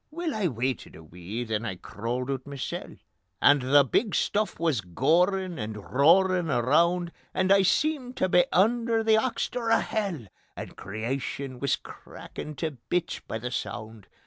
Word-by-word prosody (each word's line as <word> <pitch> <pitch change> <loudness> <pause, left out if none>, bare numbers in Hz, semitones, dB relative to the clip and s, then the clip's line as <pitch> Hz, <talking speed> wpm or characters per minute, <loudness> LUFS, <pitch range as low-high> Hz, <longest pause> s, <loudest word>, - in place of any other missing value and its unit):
Weel, 330 0 -3
I 210 -4 0
waited 130 -3 -3
a 80 - -12
wee, 90 +8 -6
then 110 -1 -2
I 110 -5 -3
crawled 120 +8 -4
oot 130 -1 -4
masel, 140 -2 -5 0.4
And 145 0 +5
the 140 +3 +5
big 205 - 0
stuff 210 +1 0
wis 160 -9 +1
gorin' 170 - +1
and 110 0 -4 0.2
roarin' 175 +5 +4
around, 170 +8 +2 0.2
And 185 +1 +2
I 195 0 +7
seemed 255 - 0
tae - - +2
be 180 -1 +4
under 230 +3 +2
the 220 0 +4
oxter 240 -1 -2
o' - - +6
hell, 195 - -2 0.3
And - - -8
Creation 125 +5 -4
wis 140 0 +1
crackin' 150 - -10
tae 150 0 -4
bits 175 -1 -1
by - - -6
the 120 +2 -5
sound. 110 -3 -6
150 Hz, 160 wpm, -27 LUFS, 120-195 Hz, 0.4 s, I